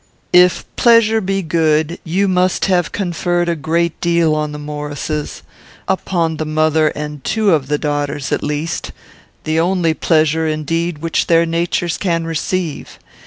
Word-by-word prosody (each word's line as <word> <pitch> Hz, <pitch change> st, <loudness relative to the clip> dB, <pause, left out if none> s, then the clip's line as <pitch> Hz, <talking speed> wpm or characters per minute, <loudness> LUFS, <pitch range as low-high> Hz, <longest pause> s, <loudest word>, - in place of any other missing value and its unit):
"If 180 Hz, 0 st, +5 dB
pleasure 230 Hz, -2 st, +4 dB
be 195 Hz, 0 st, -1 dB
good, 160 Hz, 0 st, +1 dB
you 190 Hz, +4 st, 0 dB
must 185 Hz, 0 st, +1 dB
have 180 Hz, -2 st, +1 dB
conferred 175 Hz, -2 st, -1 dB
a 170 Hz, -, 0 dB
great 165 Hz, +2 st, -1 dB
deal 170 Hz, -2 st, +2 dB
on 150 Hz, -1 st, -1 dB
the 150 Hz, -, -6 dB
Maurices; 150 Hz, 0 st, -5 dB, 0.4 s
upon 170 Hz, -4 st, -1 dB
the 155 Hz, -, -2 dB
mother 155 Hz, 0 st, +2 dB
and 150 Hz, -2 st, -6 dB
two 215 Hz, -3 st, +1 dB
of 150 Hz, -5 st, +1 dB
the 150 Hz, +1 st, 0 dB
daughters, 145 Hz, -2 st, -2 dB
at -, -, 0 dB
least, 150 Hz, +2 st, -3 dB, 0.5 s
the 155 Hz, +1 st, 0 dB
only 170 Hz, -1 st, +1 dB
pleasure, 160 Hz, 0 st, +1 dB
indeed, 155 Hz, +1 st, -2 dB
which 165 Hz, -, 0 dB
their 165 Hz, 0 st, +4 dB
natures 170 Hz, 0 st, -1 dB
can 170 Hz, -4 st, 0 dB
receive. 165 Hz, 0 st, -3 dB
165 Hz, 150 wpm, -17 LUFS, 155-175 Hz, 0.5 s, If